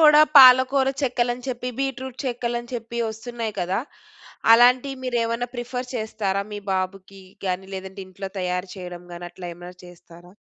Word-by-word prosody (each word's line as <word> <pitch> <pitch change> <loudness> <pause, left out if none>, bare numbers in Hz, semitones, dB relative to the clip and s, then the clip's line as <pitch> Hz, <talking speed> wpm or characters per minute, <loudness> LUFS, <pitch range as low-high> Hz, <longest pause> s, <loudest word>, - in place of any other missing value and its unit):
కూడా 300 -1 +8 0.2
పాలకూర 260 +1 +7
చెక్కలు 245 -2 +1
అని 250 - -13
చెప్పి 250 0 -3
బీట్రూట్ 265 -2 -3
చెక్కలు 240 -1 -2
అని 240 - -14
చెప్పి 235 0 -5
వస్తున్నాయి 225 0 -5
కదా! 180 +2 0 0.7
అలాంటివి 250 +3 +5
మీరు 250 -1 -1
ఏమైనా 230 +1 -2
ప్రిఫర్ 250 +1 -4
చేస్తారా 210 -3 -2
మీ 205 - -4
బాబుకి 190 +1 -4 0.2
గాని, 185 +1 -2
లేదంటే 190 +1 -7
ఇంట్లో 190 +1 -7
తయారు 180 0 -2
చేయడం 180 -1 -8
గాని 175 0 -7
అట్లా 175 0 -9
ఏమన్నా 175 +1 -11
చేస్తారా? 175 0 -16
230 Hz, 155 wpm, -23 LUFS, 185-250 Hz, 0.7 s, కూడా